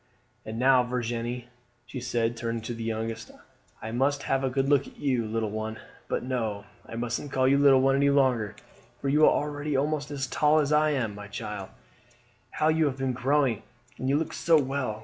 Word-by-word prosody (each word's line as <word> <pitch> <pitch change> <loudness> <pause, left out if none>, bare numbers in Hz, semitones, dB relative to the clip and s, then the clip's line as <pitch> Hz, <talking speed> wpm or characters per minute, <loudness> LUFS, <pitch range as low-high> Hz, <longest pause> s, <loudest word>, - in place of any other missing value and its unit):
"And 110 +1 -5
now, 130 +1 +5
Virginie," 120 0 -3 0.4
she 125 +2 -7
said, 120 -1 -1
turning 115 -1 -3
to 120 - -4
the 115 0 -6
youngest, 115 0 -3 0.5
"I 110 - -4
must 140 +4 +1
have 135 0 0
a 135 - +1
good 135 +1 0
look 140 -1 +3
at - - -15
you, 125 -6 0
little 110 -1 -2
one 110 +1 -4 0.3
but - - -2
no, 110 -5 -2 0.2
I 115 - -8
mustn't 120 +4 -3
call 130 0 +2
you 140 +1 +4
little 140 -2 +6
one 135 0 +3
any 140 0 +3
longer, 130 -7 +2 0.4
for 140 - -2
you 150 +3 +3
are - - +6
already 145 -1 -1
almost 145 +1 -1
as 140 -2 -3
tall 150 +3 +2
as 150 -1 +2
I 155 +1 +4
am. 125 -8 -1
My 100 0 -9
child, 105 -2 -6 0.8
how 155 - +1
you 160 0 +3
have 135 -2 -1
been 135 -1 -1
growing, 130 -3 +1 0.4
and 130 +2 -1
you 140 - +3
look 160 - -2
so 165 -2 +4
well! 130 -5 -2
130 Hz, 205 wpm, -27 LUFS, 115-140 Hz, 0.8 s, little